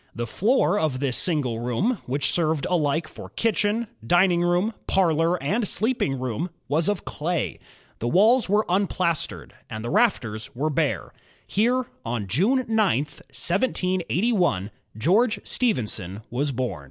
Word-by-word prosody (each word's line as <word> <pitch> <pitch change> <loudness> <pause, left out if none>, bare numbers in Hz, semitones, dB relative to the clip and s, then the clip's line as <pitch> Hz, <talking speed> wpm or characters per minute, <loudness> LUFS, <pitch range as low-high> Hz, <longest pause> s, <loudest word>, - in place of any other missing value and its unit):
The 120 - -2
floor 205 - +2
of 145 -5 0
this 135 -3 0
single 145 - +1
room, 150 - 0
which 135 +2 +1
served 160 -4 0
alike 160 -2 +1
for - - -10
kitchen, 220 0 0 0.2
dining 175 +7 +3
room, 175 +5 +1
parlor, 165 -2 +2
and 205 +9 0
sleeping 215 - 0
room, 130 +7 -3 0.2
was 155 +6 +1
of 205 -3 -2
clay. 170 +3 -2 0.4
The 120 - -2
walls 215 - +4
were 210 +2 +3
implastered, 170 - -1 0.2
and 110 +1 -6
the 120 - -3
rafters 115 - 0
were 150 +5 -1
bare. 140 - -1 0.3
Here, 245 +5 +1 0.2
on 115 -3 -3
Jime 200 - +2
9, 225 - -1 0.3
1781, 180 - 0 0.3
George 210 - +2
Stephenson 110 - -2
was 140 +5 0
bom. 120 - -3
170 Hz, 135 wpm, -24 LUFS, 125-205 Hz, 0.4 s, walls